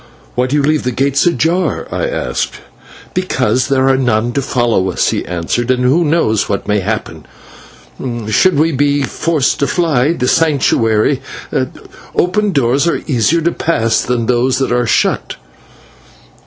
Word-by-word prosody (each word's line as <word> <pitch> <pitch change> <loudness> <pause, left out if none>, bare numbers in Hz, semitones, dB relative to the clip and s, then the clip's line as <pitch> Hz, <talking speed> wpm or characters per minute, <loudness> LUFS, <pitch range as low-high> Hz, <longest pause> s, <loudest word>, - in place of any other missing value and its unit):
"Why 125 +1 0
do 135 - -1
you 145 - +2
leave 155 +1 +2
the 125 - -2
gates 135 +5 +1
ajar?" 170 +4 0
I - - -1
asked. - - -3 0.6
"Because 130 -9 0
there 135 -1 +2
are 135 -1 +3
none 120 -2 +1
to 140 - 0
follow 120 -8 0
us," 90 - 0
he - - -2
answered, 90 +8 -2
"and 125 -1 +1
who 140 +8 +3
knows 150 -9 +1
what 100 - -2
may 105 0 +1
happen. 110 +3 -4 1.0
Should 175 - +3
we 160 +3 +3
be 145 0 +1
forced 155 +1 0
to 140 - +1
fly 155 -2 +1
the 125 -6 -2
Sanctuary, 135 -5 +2 0.9
open 205 +3 +1
doors 140 0 +1
are 170 - -1
easier 145 +4 +1
to 170 +2 +1
pass 115 -11 0
than 120 -2 -1
those 125 +2 +1
that 135 -1 -1
are 120 -1 +1
shut." - - 0
130 Hz, 155 wpm, -15 LUFS, 120-155 Hz, 1.0 s, are